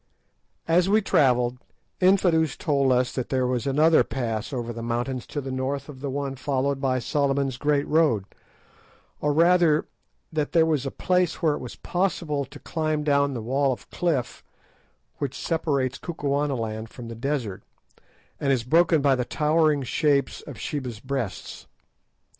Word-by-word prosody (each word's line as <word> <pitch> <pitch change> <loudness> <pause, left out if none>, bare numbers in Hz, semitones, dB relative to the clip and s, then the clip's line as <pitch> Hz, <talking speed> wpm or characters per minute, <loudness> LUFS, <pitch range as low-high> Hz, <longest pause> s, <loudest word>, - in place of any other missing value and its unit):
As 175 +3 +3
we 215 +1 +4
travelled, 125 -6 +2 0.4
Infadoos 180 -4 +3
told 140 -3 +1
us 125 0 +2
that 130 - -3
there 130 -1 +1
was 125 +1 -1
another 155 +4 +4
pass 115 -3 -3
over 120 -3 -3
the 115 - -6
mountains 120 +2 -3
to 145 - -4
the 135 -1 -5
north 130 +2 -2
of 135 -3 -10
the 140 - -3
one 140 0 -3
followed 135 0 -1
by 130 -2 +1
Solomon's 135 0 0
Great 145 +1 +1
Road, 150 -11 +2 0.9
or 150 - +1
rather 165 0 +4 0.5
that 150 -2 -1
there 165 -2 +5
was 150 -4 0
a - - 0
place 180 +3 0
where 155 -2 +4
it - - -4
was 125 - -7
possible 170 -6 -1
to 135 - -13
climb 155 -2 -2
down 140 -2 +2
the 115 - -4
wall 135 +3 +1
of 125 - -7
cliff 150 -9 -1 0.8
which 140 -3 -3
separates 140 -5 -1
Kukuanaland 140 -9 -2
from 120 0 -9
the 115 - -6
desert, 120 -5 -3 0.8
and 140 - +1
is 125 -4 +1
broken 160 +3 +3
by 140 -1 +5
the 125 -1 0
towering 150 +1 +2
shapes 140 +2 +1
of 140 -6 -8
Sheba's 125 -3 -4
Breasts. 130 -5 -5
140 Hz, 160 wpm, -25 LUFS, 125-155 Hz, 0.9 s, there